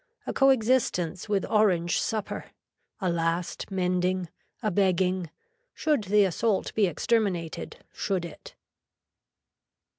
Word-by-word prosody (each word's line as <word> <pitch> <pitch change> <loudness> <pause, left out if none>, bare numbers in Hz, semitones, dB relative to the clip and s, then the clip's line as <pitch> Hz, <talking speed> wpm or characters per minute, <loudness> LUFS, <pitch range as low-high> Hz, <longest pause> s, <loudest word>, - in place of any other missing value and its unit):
A - - -3
co 270 0 +5
existence 220 -8 +1
with 200 -2 +1
orange 180 -6 +2
supper. 215 -2 -3 0.6
A 185 - 0
last 170 +1 -2
mending. 180 -1 0 0.3
A 215 - +1
begging. 185 -2 +1 0.5
Should 295 -9 +1
the 205 +2 +4
assault 195 +3 0
be 210 -3 +3
exterminated, 180 -2 -1 0.2
should 185 -3 -1
it. 170 - -11
190 Hz, 110 wpm, -27 LUFS, 175-215 Hz, 0.6 s, co